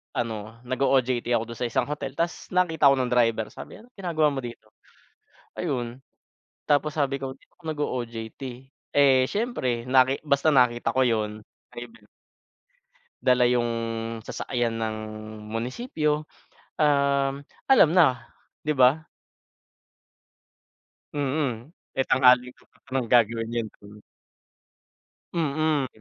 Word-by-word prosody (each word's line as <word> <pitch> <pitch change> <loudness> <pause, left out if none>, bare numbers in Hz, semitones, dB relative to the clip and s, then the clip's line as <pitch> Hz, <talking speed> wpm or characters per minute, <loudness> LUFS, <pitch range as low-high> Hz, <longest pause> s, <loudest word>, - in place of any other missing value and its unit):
ano 110 -1 -3
nag-o-OJT 130 -1 +1
ako 115 - +1
dun 115 - -9
sa 120 - 0
isang 115 - 0
hotel 140 -2 -5
ta's 170 +1 -2
nakita 160 -5 +4
ako 135 - +6
ng 125 - -3
driver. 115 -3 +2
Sabi - - -10
niya, - - -13
"Anong 245 -2 -23
ginagawa 160 -5 +1
mo 135 - -3
dito?" 115 -3 -9 0.9
Ayun, 125 -6 -3 0.7
tapos 150 +1 +2
sabi 140 -1 0
ko 135 - -3
dito - - -29
ako 175 - -28
nag-o-OJT. 120 -6 -4 0.5
Eh, 135 -2 +5
siyempre 130 - -2
naki 130 +1 +4
basta 140 +2 +3
nakita 125 -4 +3
ko 130 -1 +2
yun. 110 -2 -2 0.3
Ay, 120 0 -6
bem 115 -2 -20 1.2
Dala 125 -1 +4
yung 120 -1 +2 0.6
sasakyan 115 -3 -2
ng 110 -1 -2 0.5
munisipyo. 150 - -2 0.6
Um, 140 -1 +2 0.2
alam 215 - +6
na, 130 -9 +3 0.3
'di 155 - +1
ba? 140 +4 +4 2.1
Mm, 140 -2 -2 0.3
eh, 135 - +3
tanghaling 125 -1 +4
tapat - - -28
naman 130 -2 -1
gagawin 115 -1 +3
yun. 115 -2 -1 0.2
Hmm. 105 +1 -13 1.3
Mm. 155 -3 0
130 Hz, 120 wpm, -25 LUFS, 120-145 Hz, 2.1 s, ako